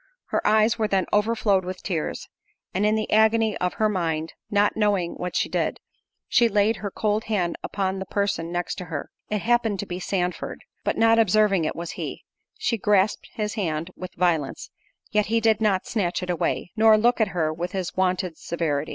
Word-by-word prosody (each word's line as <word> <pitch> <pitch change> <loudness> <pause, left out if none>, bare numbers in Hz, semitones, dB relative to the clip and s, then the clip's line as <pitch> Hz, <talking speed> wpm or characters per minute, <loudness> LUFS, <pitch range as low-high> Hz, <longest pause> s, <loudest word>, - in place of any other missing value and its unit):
Her - - 0
eyes 215 +2 +4
then 195 -2 +2
overflowed 210 -2 +2
with 185 +1 -6
tears, 165 -6 -3 0.5
and 200 +3 +2
in 215 - +3
the 215 0 -2
agony 220 0 +4
of 180 0 -1
her 215 - +2
mind, 165 -5 -1 0.2
not 205 -1 +2
knowing 205 -5 +1
what 180 0 -5
she - - +1
did, - - -1 0.5
she 235 -1 +4
laid 210 +1 +2
her 205 - -4
cold 210 +2 -1
hand 185 -6 0
upon 190 -1 -2
the 190 - -5
person 200 -5 -1
next 175 +2 -3
to 180 - -6
her—it 175 +6 -5
happened 235 -3 +2
to - - -2
be 180 -2 -5
Sandford; 180 -1 -3 0.2
but - - -1
not 225 0 +5
observing 210 -4 +3
it - - -2
was 170 0 -5
he, - - -6 0.3
she 230 - -1
grasped 205 0 +2
his 210 -1 -2
hand 165 -3 -2
with 185 0 -8
violence—yet 175 +5 -2
he 230 +2 +2
did 220 -1 +2
not 200 -4 +2
snatch 185 -5 -1
it 180 - -2
away, 175 +1 -1
nor 220 -1 +6
look 240 +2 +3
at 220 - +4
her 160 -4 -1
with 175 +3 -4
his 185 -3 -3
wonted 185 -2 0
severity. 155 -4 -2
195 Hz, 185 wpm, -24 LUFS, 180-215 Hz, 0.5 s, nor